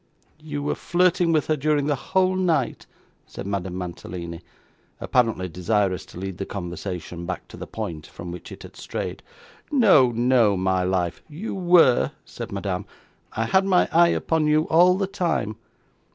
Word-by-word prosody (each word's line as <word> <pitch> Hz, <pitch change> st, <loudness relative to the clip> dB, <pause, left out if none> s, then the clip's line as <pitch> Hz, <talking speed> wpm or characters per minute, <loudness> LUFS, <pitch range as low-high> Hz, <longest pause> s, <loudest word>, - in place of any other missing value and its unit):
'You 150 Hz, -2 st, -5 dB
were 145 Hz, -, 0 dB
flirting 175 Hz, -1 st, +2 dB
with 155 Hz, -3 st, +2 dB
her 155 Hz, -, +1 dB
during 150 Hz, 0 st, +1 dB
the 145 Hz, -, +1 dB
whole 185 Hz, +7 st, +1 dB
night,' 180 Hz, -3 st, 0 dB, 0.4 s
said -, -, -8 dB
Madame 95 Hz, -2 st, -3 dB
Mantalini, 85 Hz, -1 st, -6 dB, 0.6 s
apparently 115 Hz, -7 st, +1 dB
desirous 95 Hz, +2 st, 0 dB
to -, -, -12 dB
lead 95 Hz, -1 st, -6 dB
the 95 Hz, -, -2 dB
conversation 90 Hz, -2 st, -6 dB
back -, -, -5 dB
to -, -, -10 dB
the -, -, -8 dB
point 80 Hz, -2 st, -6 dB
from 85 Hz, 0 st, -8 dB
which 90 Hz, -1 st, -9 dB
it -, -, -10 dB
had -, -, -12 dB
strayed. -, -, -5 dB, 0.5 s
'No, 195 Hz, -, +5 dB
no, 120 Hz, -3 st, +3 dB
my 95 Hz, 0 st, +1 dB
life.' 90 Hz, -2 st, -1 dB
'You 170 Hz, +9 st, -5 dB
were,' 175 Hz, -9 st, +4 dB
said -, -, -8 dB
Madame; -, -, -3 dB, 0.5 s
'I 115 Hz, -, -1 dB
had 190 Hz, +10 st, +3 dB
my 185 Hz, -2 st, +3 dB
eye 170 Hz, +1 st, +6 dB
upon 160 Hz, -2 st, +1 dB
you 155 Hz, +1 st, +3 dB
all 180 Hz, +3 st, +5 dB
the 195 Hz, -, 0 dB
time. 175 Hz, -, -1 dB
125 Hz, 165 wpm, -24 LUFS, -, 0.6 s, eye